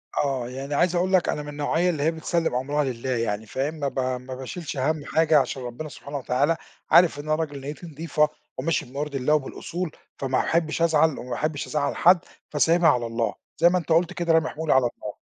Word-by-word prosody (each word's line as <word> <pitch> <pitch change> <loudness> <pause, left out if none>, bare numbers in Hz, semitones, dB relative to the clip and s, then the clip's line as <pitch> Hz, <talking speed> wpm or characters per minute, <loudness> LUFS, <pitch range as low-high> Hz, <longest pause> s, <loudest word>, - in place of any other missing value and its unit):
أ - - +2
آه 130 -3 -2
يعني 135 +3 -5
عايز 175 +4 +2
أقول 185 +2 +1
لك 185 -2 +4
أنا 150 - -1
من 150 - -8
النوعية 150 +4 0
اللي 155 -5 -1
هي 160 - +3
بتسلِّم 165 -3 -1
أمْرها 145 +4 0
لله 130 -1 -4
يعني 115 -3 -1
فاهم، 135 +8 -2
ما 145 -3 -2
ب 135 - -3
ما 130 0 -3
باشِيلش 145 +4 -6
هَم 145 +2 0
حاجة 160 -1 +4
عشان 130 0 -2
ربنا 125 +6 -6
سبحانه 145 0 -7
وتعالى 140 +5 +1 0.3
عارف 170 -4 +6
إن - - -5
أنا 155 0 +2
راجل 145 -3 -3
نيّتي 145 +5 -7
نضيفة 150 -1 0 0.3
وماشي 165 - 0
بما 135 +3 -8
يرضي 145 -1 -2
الله 135 +4 +1
وبالأصول، 160 +4 -2 0.3
فما 130 -1 0
باحبّش 165 -1 0
أزعَل 160 -2 +3
وما 125 - -8
باحبّش 145 +4 -2
أزعّل 145 -2 -1
حد 180 +1 +6 0.3
فسايبها 165 +3 +4
على 125 -5 +2
الله 115 0 -1 0.2
زي 170 +2 +6
ما 180 - +2
أنت 175 - -5
قُلت 170 +3 +3
كده، 170 -2 +1
رامي 160 -1 +3
حمولي 160 0 0
على 130 -2 +4
الله. - - -7
150 Hz, 220 wpm, -25 LUFS, 130-160 Hz, 0.3 s, عارف